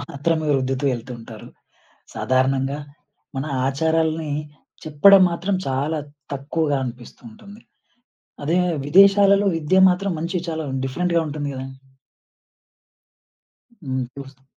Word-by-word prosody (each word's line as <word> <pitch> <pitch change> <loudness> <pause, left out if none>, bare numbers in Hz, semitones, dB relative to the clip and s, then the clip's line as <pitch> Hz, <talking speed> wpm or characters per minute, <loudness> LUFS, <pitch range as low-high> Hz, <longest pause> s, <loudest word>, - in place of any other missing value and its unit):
మాత్రమే 155 +3 -2
రుద్దుతూ 135 +1 -1
ఎళ్తుంటారు. 115 -2 -9 0.7
సాధారణంగా, 135 +2 0 0.6
మన 135 +2 -3 0.2
ఆచారాల్ని 160 +2 0 0.5
చెప్పడం 185 +6 +6
మాత్రం 185 +3 -1
చాలా 145 +4 -1 0.3
తక్కువగా 145 +1 -1
అనిపిస్తూ 120 -1 -9
ఉంటుంది. 215 0 -14 0.8
అదే 165 +5 +1 0.3
విదేశాలలో, 200 +3 +5
విద్య 165 +4 +2
మాత్రం 190 +1 -1
మంచి 170 +3 -3
చాలా 160 -1 -3 0.2
డిఫరెంట్‌గా 170 +5 0
ఉంటుంది 145 -1 -4
గదండి. 130 0 -8 2.1
హ్మ్. 130 0 -2
ఇప్పుడొస్తా 135 +1 -12
150 Hz, 95 wpm, -21 LUFS, 135-175 Hz, 2.1 s, చెప్పడం